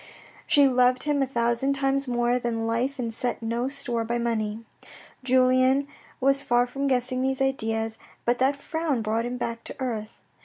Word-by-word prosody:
She 285 -1 +6
loved 250 0 +3
him 295 -1 +1
a 270 - +1
thousand 235 +2 +1
times 275 0 0
more 240 0 +1
than 230 -2 -2
life 240 +5 -1
and 235 -3 -3
set 240 0 -2
no 235 +2 -1
store 265 -4 -3
by 235 +1 -2
money. 225 -2 -2 0.6
Julien 255 +2 +3 0.3
was 275 +1 +4
lar 240 0 +4
from 275 +3 -3
guessing 255 -1 0
these 265 0 0
ideas, 225 -4 -1 0.3
but 240 +1 +1
that 265 +2 +3
frown 290 -3 -2
brought 220 +2 0
him 250 +1 -4
back 230 -1 -4
to - - -6
earth. 225 -5 -4
250 Hz, 170 wpm, -26 LUFS, 235-270 Hz, 0.6 s, She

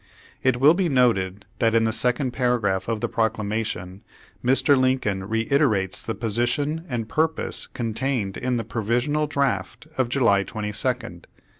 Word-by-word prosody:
It 130 -2 +1
will 145 +4 +7
be 180 -1 0
noted 105 -7 +1
that 115 0 +2
in 115 - +4
the 110 - +1
second 125 +3 0
para 125 -1 +1
graph 95 -3 -1
of 115 -2 -2
the - - 0
Proclamation 105 -4 -2 0.4
Mr. 135 +3 +4
Lincoln 130 -7 0
reiterates 115 -3 +1
the 115 - -4
position 120 +8 -1
and 115 -4 -3
purpose 160 +5 0
contained 115 -3 -2
in 125 -1 -1
the 115 - -2
provi 115 +1 -2
sional 150 +4 0
draft 130 -2 -1
of 125 -2 +2
July 115 -7 +3
22nd. 110 -2 -2
120 Hz, 150 wpm, -24 LUFS, 105-130 Hz, 0.4 s, will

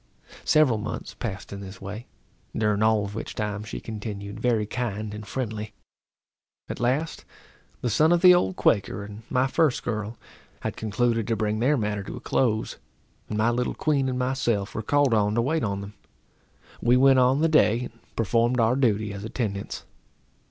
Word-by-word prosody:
Several 140 -8 +4
months 105 - -5
passed 100 -4 -6
in 100 - -6
this 95 -1 -9
way, 105 +5 -7 0.5
during 105 -1 +1
all 110 -2 +3
of 100 - -7
which 110 - -6
time 105 -1 -3
she 110 - -6
continued 105 -2 -6
very 115 -4 +1
kind 110 -2 -3
and 105 0 -8
friendly. 110 -3 -4 0.9
At - - -5
last, 135 +7 0 0.6
the 120 - 0
son 155 +9 +4
of 175 -1 +4
the 180 -1 +10
old 95 - +2
Quaker 100 0 +1
and 105 +1 -9
my 125 0 +2
first 150 0 +1
girl 110 0 -3 0.4
had - - -3
concluded 115 +1 0
to 115 - +1
bring 110 0 -1
their 140 +5 +3
matter 105 -3 -1
to 100 - -7
a - - -6
close, 115 -3 0 0.5
and 105 - -2
my 110 +2 +3
little 125 +1 -1
queen 140 -4 +1
and 125 - -2
myself 125 -5 0
were - - -3
called 145 +2 +2
on 105 -1 +2
to 115 - +3
wait 155 +4 0
on 100 -2 -1
them. 100 +1 -8 0.9
We 120 +2 +4
went 135 0 +6
on 130 +3 +4
the 165 - +4
day, 125 -7 +4
and 115 -2 -11
performed 115 +3 +2
our 115 +2 +3
duty 110 -6 +1
as 100 0 -7
attendants. 105 -3 -4
110 Hz, 180 wpm, -26 LUFS, 105-125 Hz, 0.9 s, the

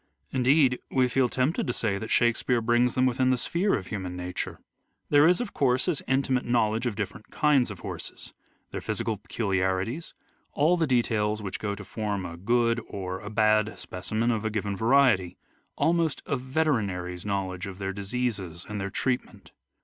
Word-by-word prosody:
Indeed 130 0 +3
we 130 -1 +3
feel 125 0 +2
tempted 130 +7 0
to 120 - 0
say 100 -5 -1
that 110 - -6
Shakespeare 120 +1 +2
brings 120 +1 +2
them 130 - +3
within 130 0 +2
the 130 - +3
sphere 175 +10 +1
of 95 - -4
human 95 -2 -5
nature. 90 0 -4 0.5
There 145 +1 +7
is, 180 +1 +4
of 245 -4 -4
course, 130 -2 +2
his 175 -6 0
intimate 130 -1 +1
knowledge 115 0 +1
of 115 - -2
different 105 +1 -5
kinds 145 -5 +3
of 100 -4 -8
horses, - - -7 0.4
their - - -4
physical 110 -2 -2
peculiarities, 100 - -1 0.4
all 155 +5 +3
the 165 -3 +1
details 110 -4 +1
which 95 - -4
go 100 -1 -2
to 105 0 -9
form 105 -3 -3
a 85 - -6
good 115 +5 +1
or 95 -1 -4
a 105 - -7
bad 110 0 +2
specimen 110 +6 -2
of 110 -2 -1
a 110 - 0
given 105 -2 -2
variety, 110 -6 +3 0.4
almost 160 0 +1
a - - 0
veterinary's 115 - -1
knowledge 95 -2 -2
of 95 -1 -7
their 95 -1 -3
diseases 100 -4 -3
and 105 -1 -4
their 100 - -2
treatment. 105 -7 -3
110 Hz, 175 wpm, -27 LUFS, 100-130 Hz, 0.5 s, There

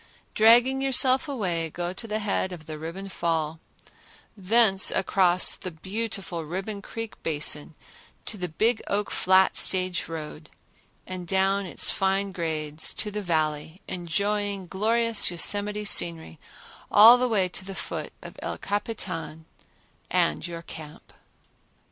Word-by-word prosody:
Dragging 240 +4 +5
yourself 265 0 +3
away, 175 -11 -2
go 175 +2 -4
to 225 - -7
the 215 0 -2
head 205 -3 -2
of 165 -4 -10
the 155 -1 -8
Ribbon 170 +5 -7
Fall, 165 -4 -2 0.8
thence 200 0 +4
across 185 -1 +3
the 185 - -7
beautiful 190 0 -5
Ribbon 195 +6 -5
Creek 225 +1 -8
Basin 150 0 0 0.5
to - - -3
the 180 -3 -4
Big 220 +8 0
Oak 205 +1 -1
Flat 190 +1 +3
stage 185 -2 +1
road, 155 -1 -8 0.6
and 185 -1 -7
down 195 +1 +1
its - - +3
fine 195 +1 0
grades 160 -3 -2
to 210 - -1
the 210 +1 -4
Valley, 160 -1 -2
enjoying 200 +3 -2
glorious 225 +4 +2
Yosemite 205 +4 +1
scenery 165 - +2 0.5
all 230 +4 +8
the 250 0 0
way 200 -5 +1
to 185 - -8
the 195 0 -8
foot - - -6
of - - -10
El - - -5
Capitan 180 -6 -5 0.6
and 75 - 0
your 170 -1 -8
camp. 155 -2 -12
190 Hz, 135 wpm, -25 LUFS, 165-210 Hz, 0.8 s, all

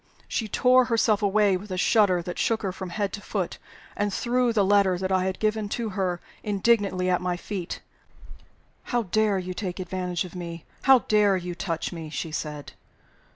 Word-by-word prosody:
She 225 - -2
tore 255 +4 +4
herself 225 -3 +2
away 205 -1 +3
with 205 +3 -11
a 185 - -3
shudder 185 -2 +3
that 175 +1 -5
shook 225 -1 +1
her 195 - -1
from 185 0 -7
head 200 +1 -2
to 205 - -5
foot, - - -3 0.4
and 205 0 0
threw 245 +3 +1
the 210 -3 +2
letter 195 -2 +4
that 190 +1 -2
I 185 -1 +2
had 190 0 -2
given 215 -1 0
to 230 -2 -2
her 185 -3 -1 0.2
indignantly 200 -3 +1
at 180 -1 +2
my 180 -1 -1
feet. 185 -1 -5 1.0
"How 240 -2 0
dare 215 +1 +1
you 185 0 -4
take 185 -2 -4
advantage 180 -1 -2
of 180 - -10
me! 170 -2 -7 0.2
How 265 -2 +6
dare 210 -2 +4
you 180 -1 -5
touch 170 0 -3
me!" 165 -2 -7
she 160 +1 -4
said. 150 -2 -5
190 Hz, 190 wpm, -26 LUFS, 180-215 Hz, 1.0 s, How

